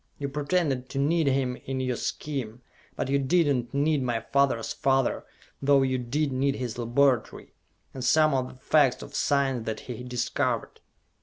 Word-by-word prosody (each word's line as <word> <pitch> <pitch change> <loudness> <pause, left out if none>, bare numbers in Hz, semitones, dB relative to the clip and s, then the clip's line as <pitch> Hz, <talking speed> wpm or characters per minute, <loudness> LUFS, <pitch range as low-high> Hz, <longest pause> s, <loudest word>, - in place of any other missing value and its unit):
You 140 -1 -3
pretended 140 -3 -1
to - - -6
need 155 +3 +2
him 130 -2 +1
in 135 0 -3
your 130 -1 -1
scheme; 125 -4 -4 0.3
but - - -2
you 140 +1 +2
did 165 +6 +3
not 120 -1 -4
need 145 +1 +1
my 120 -3 -1
father's 140 -5 +2
father, 135 -1 0 0.3
though 140 0 +4
you 130 -1 0
did 140 +4 -1
need 135 +1 0
his 125 -2 -5
laboratory, 120 0 +1 0.4
and 130 - -6
some 155 +4 +4
of 130 -1 0
the - - -12
facts 135 0 +2
of - - -11
science 135 -5 0
that 110 - -3
he 125 -1 -7
discovered. 125 -1 -2
135 Hz, 170 wpm, -27 LUFS, 125-140 Hz, 0.4 s, though